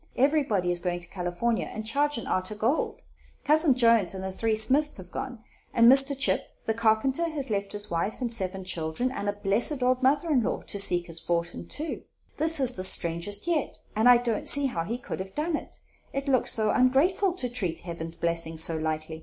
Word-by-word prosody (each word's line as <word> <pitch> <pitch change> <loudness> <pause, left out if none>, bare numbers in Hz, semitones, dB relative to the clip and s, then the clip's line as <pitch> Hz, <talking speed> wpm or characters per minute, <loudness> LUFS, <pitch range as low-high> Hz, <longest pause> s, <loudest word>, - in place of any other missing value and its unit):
Everybody 260 - +1
is 175 - +2
going 175 0 -3
to 170 - -5
California 180 +6 -2
and 215 0 -6
Chagrin 285 +1 0
arter 185 +3 -2
gold. 230 +8 -1 0.4
Cousin 305 -2 +4
Jones 230 -6 +3
and 190 - -6
the 190 - -4
three 220 +3 -1
Smiths 270 +8 +1
have 180 -2 -10
gone; 250 -4 -6 0.3
and 235 0 +6
Mr. 270 +1 +4
Chip, 260 - +1 0.2
the 225 - 0
carpenter, 230 +9 +1
has 280 -6 -5
left 200 -1 -2
his 205 -2 -5
wife 170 +5 -2
and 245 -3 -2
seven 190 -3 -2
children 175 +7 -2
and 205 -6 -3
a - - -1
blessed 215 +7 +1
old 255 +1 +1
mother 290 +5 +2
in 265 -5 +3
law, - - -2
to 200 - -2
seek 175 -3 +3
his 165 -1 -2
fortin, 170 0 -3
too. 315 +2 -4 0.4
This 320 +1 +4
is 260 -2 +3
the 185 - -3
strangest 170 - +2
yet, 330 -5 -2 0.2
and 220 +3 +4
I 245 - +8
don't 235 -2 -1
see 285 0 +4
how 170 -11 -2
he 230 +6 -3
could 245 - -7
have 190 0 -7
done 315 +2 -1
it; - - -8 0.4
it 275 +1 -4
looks 260 -3 +2
so 215 -1 +1
ongrateful 315 +10 +2
to 250 - -1
treat 195 -9 -2
Heaven's 165 -1 -5
blessings 165 -1 0
so 165 - 0
lightly. 155 0 -4
225 Hz, 205 wpm, -26 LUFS, 180-270 Hz, 0.4 s, I